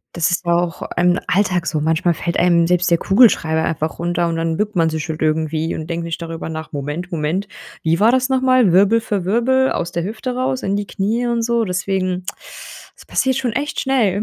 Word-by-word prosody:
Das 170 0 +1
ist 175 0 -1
ja 170 - +2
auch 175 -1 -1
im 180 0 +3
Alltag 180 -3 +1
so. 155 -2 -1
Manchmal 165 +3 +1
fällt 170 +2 -3
einem 170 -1 +3
selbst 180 0 +1
der 170 - +4
Kugelschreiber 195 -7 +3
einfach 160 0 -2
runter 175 0 0
und 165 - -2
dann 165 0 -1
bückt 210 0 -2
man 165 -2 +3
sich 160 +1 -4
halt 155 0 -4
irgendwie 155 +1 0
und 160 0 -6
denkt 170 0 -3
nicht 165 0 -5
darüber 165 -1 -6
nach: 160 0 -6
„Moment, 150 +5 -5
Moment. 165 +5 -2 0.4
Wie 165 +1 +1
war 225 +3 +5
das 255 0 +1
nochmal? 255 -6 +3
Wirbel 200 +5 +4
für 205 -5 -2
Wirbel 260 +6 +2
aus 170 0 -2
der 170 -1 -2
Hüfte 225 +5 -4
raus, 255 0 -1
in 195 - 0
die 205 0 -2
Knie 220 +5 -1
und 235 -1 0
so“ 235 0 +1
deswegen, 185 0 -2 0.7
das - - -16
passiert 265 0 +1
schon 250 -4 -1
echt 285 +4 -2
schnell. 220 -7 +1
180 Hz, 215 wpm, -19 LUFS, 165-220 Hz, 0.7 s, war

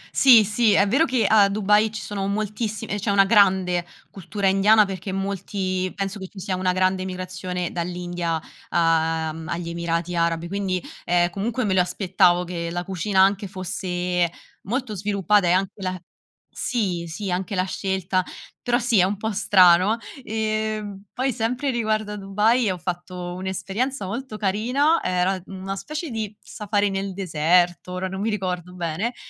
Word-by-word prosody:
Sì, 245 -5 +8
sì, 215 +1 +2
è 200 - +4
vero 270 +10 +3
che 255 -7 +1
a 205 -2 +5
Dubai 210 +1 +3
ci 215 - -5
sono 200 -2 -4
moltissime 210 +1 -3
c'è 205 +1 -2
una 200 -1 +5
grande 190 -4 +3 0.3
cultura 195 +2 -5
indiana 205 +3 +5
perché 190 0 -5
molti 190 -1 -2
penso 195 +1 -3
che 190 - -6
ci 195 - -12
sia 185 0 -2
una 185 0 +1
grande 185 0 +1
emigrazione 185 -1 -4
dall'India, 175 -1 -3 0.3
uhm, 160 -1 +1
agli 170 0 -3
Emirati 170 +1 -2
Arabi, 170 0 0
quindi, 195 -1 -1 0.3
ehm, 175 0 +2
comunque 225 +6 -2
me 190 - +1
lo 185 - +4
aspettavo 180 -1 +2
che 170 -1 -4
la 175 +1 -3
cucina 190 +1 +1
anche 200 +1 +3
fosse 180 -2 -2 0.4
molto 250 0 -2
sviluppata 200 -1 +2
e 175 - +4
anche 195 +2 0
la 185 0 -3 0.6
sì, 190 -8 -1
sì, 180 +4 -4
anche 185 +2 -2
la 185 - +2
scelta, 190 -1 -1 0.4
però 240 0 +1
sì, 235 -4 +2
è - - +6
un 200 +2 -2
po' 220 +2 -2
strano. 190 0 +5 0.3
Ehm, 215 -2 -3
poi 260 +1 -1
sempre 250 +5 -1
riguardo 215 -3 -1
a 210 - -4
Dubai 210 +4 +2
ho 185 - -2
fatto 175 0 -5
un'esperienza 195 +7 -3
molto 225 +3 -5
carina, 245 - +1
era 185 +1 0
una 195 0 -5
specie 305 - -5
di 215 -2 -4
safari 205 -1 -1
nel 195 0 -3
deserto, 175 0 +1
ora 185 +1 -2
non 190 +1 -5
mi 220 - 0
ricordo 180 -4 -3
bene 180 +8 -2
195 Hz, 160 wpm, -23 LUFS, 180-210 Hz, 0.6 s, Sì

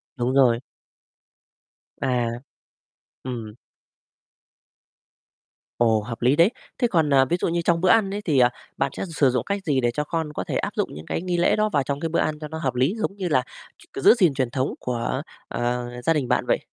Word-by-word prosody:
Đúng 125 -1 -1
rồi. 125 -4 +5 1.4
À. 125 -2 +1 1.0
Ừm. 115 -4 -5 2.2
Ồ, 110 -2 +3
hợp 115 +3 -7
lý 125 +4 +4
đấy. 170 +5 +5 0.3
Thế 245 - +2
còn, 160 -8 +2
à, 135 -1 +6
ví 175 +7 0
dụ - - +1
như 170 0 0
trong 170 0 +1
bữa 185 - +3
ăn 215 -2 +4
ấy 205 - -3
thì, 150 -6 +2
ờ, 125 -1 +6 0.3
bạn 135 - 0
sẽ - - -2
sử 140 -3 +4
dụng 125 0 0
cách 200 -1 -2
gì 140 -4 +1
để 120 -1 +1
cho 150 +5 -2
con 160 0 -3
có - - -3
thể - - -2
áp - - -2
dụng - - 0
những 75 +2 -9
cái - - -3
nghi 180 -1 -1
lễ 175 - +3
đó 215 0 +1
vào 140 -2 +2
trong 140 +1 -3
cái 165 - -2
bữa 170 - 0
ăn 155 -1 -1
cho 155 - -6
nó 160 +1 -6
hợp 130 -6 -2
lý, 130 - +2
giống 215 -3 -2
như 190 -2 -2
là 130 -5 +3 0.5
ch - - -8
giữ - - +8
gìn 180 - +3
truyền 130 -3 -1
thống 130 +2 -1
của, 125 +2 -2 0.3
ờ, 120 0 -2 0.2
gia 165 - +3
đình 145 -5 -1
bạn 125 - +1
vậy? - - +2
140 Hz, 220 wpm, -24 LUFS, 125-165 Hz, 2.2 s, giữ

